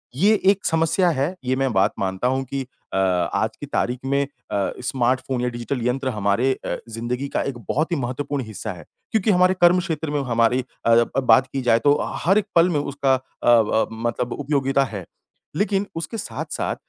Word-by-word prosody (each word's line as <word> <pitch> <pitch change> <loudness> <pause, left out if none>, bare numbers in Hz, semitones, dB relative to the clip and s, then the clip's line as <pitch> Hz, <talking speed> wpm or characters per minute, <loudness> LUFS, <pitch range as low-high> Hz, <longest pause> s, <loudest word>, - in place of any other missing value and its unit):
ये 200 +10 +4 0.2
एक 200 -1 -4
समस्या 165 +3 +2
है। 155 +4 -1
ये 130 +1 +1
मैं 135 -1 0
बात 95 +2 +3
मानता 95 +4 -1
हूँ 130 +1 0
कि 135 +1 -4 0.3
अ, - - 0
आज 90 -2 0
की - - -6
तारीख 125 +1 -1
में 140 +1 +1
अ, 125 -8 -4
स्मार्टफ़ोन 130 0 0
या 125 - 0
डिजिटल 120 +2 -4
यंत्र 130 +1 -1
हमारे 105 +3 +1
अ, - - -2
ज़िंदगी 120 +4 -3
का - - +2
एक 140 -3 -4
बहुत 155 +5 0
ही - - +2
महत्वपूर्ण 135 +2 -3
हिस्सा 110 0 -6
है 85 -3 -12 0.3
क्योंकि 220 -1 +2
हमारे 185 0 +4
कर्म 175 +1 +6
क्षेत्र 160 -3 -3
में 145 - 0
हमारी 115 +1 +2 0.2
अ, 115 - +5
ब 120 +3 +2
बात 130 +1 +5
की 135 - -1
जाए 115 -2 +3
तो 145 +2 +3 0.3
हर 195 +4 +4
एक 210 - +1
पल 170 +2 +5
में 155 -4 +1
उसका 140 -2 +1
अ - - -3 0.3
अ, 110 -2 +4
मतलब 120 +2 -2
उपयोगीता 140 -1 +1
है, 100 -9 -6 0.5
लेकिन 205 +1 0
उसके 170 +8 -4
साथ-साथ - - -4
130 Hz, 195 wpm, -22 LUFS, 120-150 Hz, 0.5 s, कर्म